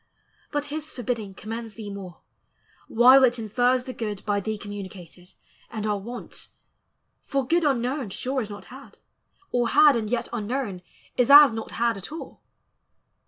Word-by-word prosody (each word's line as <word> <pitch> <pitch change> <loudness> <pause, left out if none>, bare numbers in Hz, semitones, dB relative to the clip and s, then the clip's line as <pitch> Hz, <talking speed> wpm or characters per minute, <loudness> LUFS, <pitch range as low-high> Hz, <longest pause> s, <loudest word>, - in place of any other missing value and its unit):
but 290 -1 -1
his 310 0 -5
forbidding 225 -5 -4
Commends 225 +1 -7
thee 210 -3 -7
more, 190 -3 -9 0.7
while 255 +4 +7
it 245 -1 +4
infers 245 +3 +1
the 255 - -7
good 210 -4 -5
By 205 -1 +1
thee 215 +2 -3
communicated, 190 -3 -10 0.4
and 215 -2 -5
our 210 -1 0
want: 240 +5 -8 0.8
For 275 -2 -1
good 335 +5 +2
unknown 260 -3 0
sure 260 +7 -2
is 215 - -6
not 205 0 -9
had, 270 +1 -13 0.5
or 240 -1 +1
had 295 -2 +6
And 220 -2 -2
yet 240 0 -1
unknown 225 -4 -3 0.4
is 250 0 +2
as 290 -1 +10
not 225 0 -6
had 235 -2 0
at 195 - -9
all. 320 - -9
235 Hz, 160 wpm, -25 LUFS, 205-260 Hz, 0.8 s, as